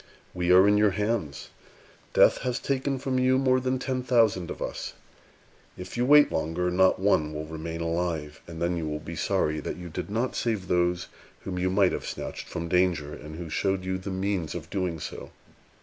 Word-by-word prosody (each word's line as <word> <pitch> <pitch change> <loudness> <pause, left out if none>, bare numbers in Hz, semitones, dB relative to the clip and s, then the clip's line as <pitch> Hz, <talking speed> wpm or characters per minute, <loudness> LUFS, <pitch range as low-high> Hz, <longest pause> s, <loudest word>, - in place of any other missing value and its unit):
We 90 0 0
are 95 +2 +7
in 105 0 +4
your 105 0 +5
hands. 105 -9 -2 0.7
Death - - +6
has 125 -1 -2
taken 135 0 -1
from 130 -1 -1
you 130 0 +3
more 130 -1 +3
than 130 0 0
ten 130 0 -2
thousand 115 -8 +2
of - - -6
us. - - -5 0.8
If 90 +1 -8
you 120 +1 +1
wait 145 +1 +7
longer, 85 +3 -1
not 95 +1 +4
one 80 -6 +1
will 75 +1 -4
remain 80 +1 -6
alive; 85 -3 -2
and 85 -1 -8
then 85 +1 0
you 80 -2 -3
will 75 0 -2
be 85 +2 -7
sorry 75 0 0
that - - -5
you 90 -1 -8
did 80 - -5
not 115 +5 -1
save 110 -6 -1
those 90 0 +1 0.3
whom 90 -1 -4
you 90 +1 +1
might 95 0 +3
have - - -4
snatched - - -6
from 85 - -4
danger, 85 -5 +1
and 75 +1 -9
who 85 0 -6
showed 95 +4 -1
you 95 0 -2
the 95 - -6
means 95 -3 -2
of - - -7
doing 90 -4 -2
so. - - -7
90 Hz, 200 wpm, -27 LUFS, 85-110 Hz, 0.8 s, are